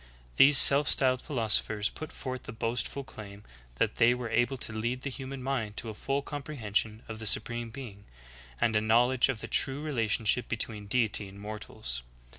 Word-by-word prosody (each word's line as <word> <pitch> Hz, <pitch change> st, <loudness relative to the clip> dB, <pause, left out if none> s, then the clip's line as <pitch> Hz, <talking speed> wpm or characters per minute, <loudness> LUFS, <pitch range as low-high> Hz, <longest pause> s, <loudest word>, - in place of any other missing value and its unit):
These 140 Hz, +1 st, +7 dB
self 140 Hz, +2 st, +8 dB
styled 130 Hz, -1 st, +2 dB
philosophers 110 Hz, -5 st, +1 dB
put 155 Hz, 0 st, -9 dB
forth 130 Hz, -4 st, -7 dB
the -, -, -7 dB
boast 115 Hz, +1 st, -2 dB
ful 140 Hz, -, -7 dB
claim 105 Hz, -5 st, -12 dB, 0.3 s
that -, -, -1 dB
they 120 Hz, +1 st, +4 dB
were 125 Hz, -2 st, -6 dB
able 120 Hz, +3 st, +1 dB
to 115 Hz, -, -4 dB
lead 120 Hz, +4 st, -3 dB
the 140 Hz, -, -4 dB
human 130 Hz, 0 st, -6 dB
mind 120 Hz, -6 st, -3 dB
to 115 Hz, -, -4 dB
a -, -, -6 dB
full 135 Hz, +6 st, -3 dB
comprehension 115 Hz, -7 st, -3 dB
of 110 Hz, -1 st, -7 dB
the 110 Hz, -, -3 dB
Supreme 115 Hz, +2 st, +2 dB
Being, 110 Hz, -6 st, -10 dB, 0.5 s
and 110 Hz, -2 st, +1 dB
a 110 Hz, -, +3 dB
knowl 115 Hz, +3 st, +3 dB
edge 130 Hz, 0 st, +2 dB
of 120 Hz, -4 st, -2 dB
the -, -, -6 dB
true 140 Hz, +2 st, +1 dB
relationship 115 Hz, -4 st, 0 dB
betv/een 110 Hz, -2 st, -2 dB
Deity 110 Hz, -4 st, +2 dB
and 100 Hz, -, -14 dB
mortals. 105 Hz, -, -5 dB
115 Hz, 190 wpm, -29 LUFS, 110-135 Hz, 0.5 s, self